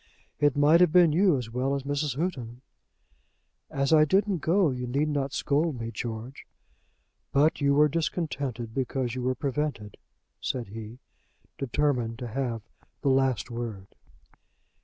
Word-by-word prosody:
"It 145 -1 +3
might 150 +4 +5
have 180 -3 +5
been 175 -2 +6
you 180 -2 +4
as 120 -3 -6
well 130 +3 0
as 140 - -3
Mrs. 145 0 -1
Houghton." 130 -8 -3 1.1
"As 140 +2 0
I 155 -1 +7
didn't 190 +4 +2
go, 170 0 +2
you 125 -1 -4
need 140 +5 0
not 140 -2 -1
scold 145 -1 0
me, 115 0 -4
George." 115 +3 -6 0.8
"But 150 +3 +3
you 140 0 +3
were 150 +1 +6
discontented 145 -7 -3
because 130 -1 -2
you 130 - -4
were 130 +1 0
prevented," 135 -6 -3 0.4
said 120 -6 -3
he, 110 +2 -8 0.6
determined 125 -4 0
to 125 -1 -6
have 120 -3 -3 0.4
the 140 - +2
last 130 -5 +1
word. 115 -5 -5
135 Hz, 145 wpm, -27 LUFS, 120-150 Hz, 1.1 s, I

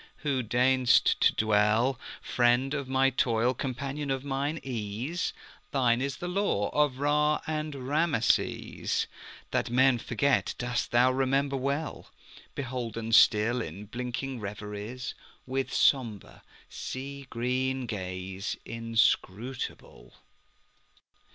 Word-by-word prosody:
who 135 -3 +1
deign'st 125 +2 +3
to - - +5
dwellFriend 120 +4 +2
of 140 -3 -3
my 135 0 +3
toil, 120 -1 +2
companion 140 +3 -4
of 135 -1 -1
mine 140 +3 -2
ease, 125 - -3 0.4
Thine 125 -5 +2
is 140 0 -2
the 175 - -5
lore 180 - 0
of 145 -3 +2
Ra 150 +2 +2
and 155 -1 -3
Rameses; 145 -4 +1 0.5
That - - 0
men 130 0 +4
forget 125 +3 +1
dost 125 0 -2
thou 125 +2 +4
remember 135 +1 +1
well, 140 +4 -2 0.5
Beholden 120 -4 -4
still 115 +2 +5
in 95 +3 -7
blinking 125 +3 -4
reveriesWith 105 +5 -5
sombre, 115 -7 +1 0.3
sea 140 +1 -6
green 130 +2 -1
gaze 95 -1 -4
inscrutable. 115 +1 -1
130 Hz, 100 wpm, -29 LUFS, 115-135 Hz, 0.5 s, to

